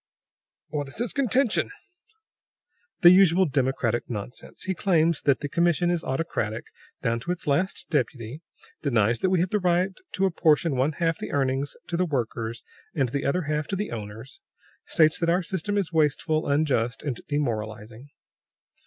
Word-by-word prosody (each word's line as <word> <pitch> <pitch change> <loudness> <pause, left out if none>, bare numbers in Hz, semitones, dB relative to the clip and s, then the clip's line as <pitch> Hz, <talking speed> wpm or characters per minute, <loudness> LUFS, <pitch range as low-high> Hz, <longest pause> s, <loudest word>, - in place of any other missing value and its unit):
"What 145 -1 -3
is 140 - -9
his 240 +2 -1
contention?" 260 -3 +2 1.3
"The 175 -2 +9
usual 185 0 +6
democratic 130 -5 0
nonsense. 110 +1 -7
He 190 - -1
claims 170 -4 +2
that 140 -2 +2
the 145 - -2
commission 175 +3 +2
is 175 -2 -1
autocratic, 130 -6 -2 0.4
down 115 0 +1
to 170 - -4
its 180 0 -4
last 165 +6 0
deputy. 130 -1 -2 0.4
Denies 115 -5 +2
that 190 - +1
we 185 -2 +2
have 180 - -1
the 210 - +2
right 180 +1 +2 0.2
to 195 - +1
apportion 165 -4 +2
one 135 +4 +1
half 165 +1 0
the - - -5
earnings 135 0 0
to 170 - -3
the 180 - +2
workers 115 -5 -3 0.3
and 135 -4 +1
the 140 +3 -2
other 180 +5 +1
half 150 0 -2
to 195 - -2
the 205 +2 -3
owners. 110 +3 -8 0.5
States 155 -1 +3
that 170 - +1
our 180 +2 +2
system 195 +2 -2
is 185 -4 -1
wasteful, 155 0 +1
unjust, 140 -4 +1
and 135 -6 -3
demoralizing." 115 -3 -3
150 Hz, 160 wpm, -26 LUFS, 125-175 Hz, 1.3 s, The